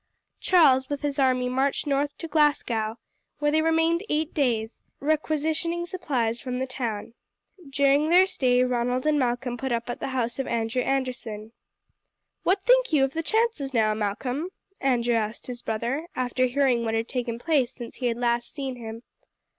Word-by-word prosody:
Charles 265 -8 +4
with 285 -1 -3
his 285 -1 -1
army 255 -2 +2
marched 265 +4 0
north 285 0 0
to 330 - -6
Glasgow, 240 -8 +1 0.4
where 295 0 +1
they 315 +1 +3
remained 325 +2 +2
eight 310 +1 -1
days, 235 -6 -1 0.2
requisitioning 315 +3 0
supplies 255 - -2
from 250 -1 -4
the 260 - -1
town. 230 -4 -4 0.6
During 280 +2 +3
their 360 +2 +7
stay 250 -9 +2
Ronald 250 +1 0
and 305 -1 +3
Malcolm 245 -1 -1
put 265 +1 -3
up 235 0 -1
at - - -6
the - - -3
house 250 -2 -2
of 270 - -2
Andrew 230 +2 0
Anderson. 250 -5 -3 0.9
"What 380 +1 +1
think - - +4
you 295 -4 +4
of 270 0 0
the 325 - -1
chances 380 - 0
now, 215 -2 +3
Malcolm?" 245 - -2 0.3
Andrew 245 -3 +1
asked 220 0 -2
his 245 -1 -7
brother, 240 +9 -2
after 255 0 +1
hearing 255 -2 +2
what 225 -1 -1
had 225 +1 -1
taken 245 -3 -3
place 275 -2 +1
since 235 -2 -9
he 250 - -1
had 235 -1 -1
last 240 0 0
seen 270 -4 -5
him. 225 0 -8
260 Hz, 170 wpm, -26 LUFS, 240-295 Hz, 0.9 s, their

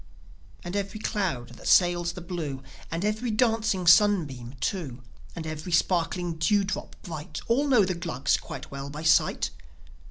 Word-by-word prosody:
And 175 +2 -5
every 200 +1 -3
cloud 185 - -2
that 120 - -10
sails 175 -1 +4
the 180 - -8
blue, 160 -7 -5 0.3
And 165 +4 -2
every 215 +3 -1
dancing 220 -4 +1
sunbeam 165 - +4
too, 140 -10 -3 0.3
And 165 -2 -5
every 155 +3 -5
sparkling 175 0 +1
dewdrop 200 +4 0
bright 155 -2 -6
All 270 +6 +2
know 245 -8 +5
the 185 - -1
Glugs 140 -6 0
quite - - -8
well 140 0 -6
by 150 +2 -7
sight. 160 - +3
175 Hz, 150 wpm, -27 LUFS, 155-205 Hz, 0.3 s, know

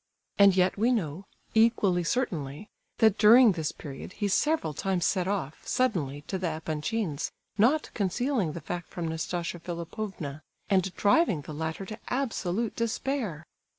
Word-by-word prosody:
And 200 -2 +7
yet 185 +1 +2
we 235 +4 +3
know, 185 - -2 0.3
equally 215 -5 +3
certainly, 165 - -2 0.3
that 220 -3 +4
during 230 +2 +8
this 160 -4 -2
period 140 +5 -9
he 205 - -1
several 295 - +1
times 185 +2 -1
set 185 -2 +1
off, 185 -7 -3
suddenly, 160 - 0
to 190 +6 -4
the 180 - -1
Epanchins', 160 +2 -2 0.3
not 275 +9 +3
concealing 205 - 0
the 170 - -6
fact 175 -1 -5
from 170 -2 -4
Nastasia 170 +2 -3
Philipovna, 170 -3 -5 0.3
and 190 -1 +3
driving 205 - +3
the 155 - -8
latter 160 +5 -4
to 215 +3 -8
absolute 230 -5 -1
despair. 230 - -2
190 Hz, 145 wpm, -28 LUFS, 160-225 Hz, 0.3 s, during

